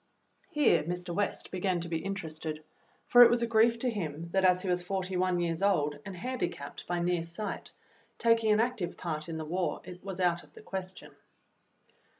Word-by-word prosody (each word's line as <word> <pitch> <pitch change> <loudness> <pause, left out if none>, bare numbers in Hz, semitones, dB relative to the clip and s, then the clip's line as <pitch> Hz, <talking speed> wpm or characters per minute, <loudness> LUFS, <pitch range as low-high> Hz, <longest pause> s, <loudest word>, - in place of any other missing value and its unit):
Here 300 -6 +4
Mr. 175 +2 -4
West 205 +3 -1
began 185 -1 0
to 170 - -5
be 165 -1 -1
interested, 160 -5 -4 0.4
for 245 - +7
it 240 - +11
was 240 0 +2
a - - +3
grief 230 0 +4
to 250 +2 0
him 165 -5 -4
that, 190 -1 +2
as 180 0 +4
he - - -3
was 180 0 +1
forty 185 0 -3
one 180 -1 +1
years 170 -1 -1
old 150 -7 +2
and 195 -2 -7
handicapped 240 - -4
by 175 0 -1
near 175 0 +1
sight, 170 +5 -5 0.5
taking 230 -2 +3
an 210 - +4
active 230 -6 -1
part 155 -2 -4
in 160 - -4
the 160 - -4
war 180 +3 -2 0.2
was 190 -2 -6
out 175 -2 +2
of - - -20
the - - -13
question. 190 -2 -6
180 Hz, 190 wpm, -30 LUFS, 170-205 Hz, 0.5 s, it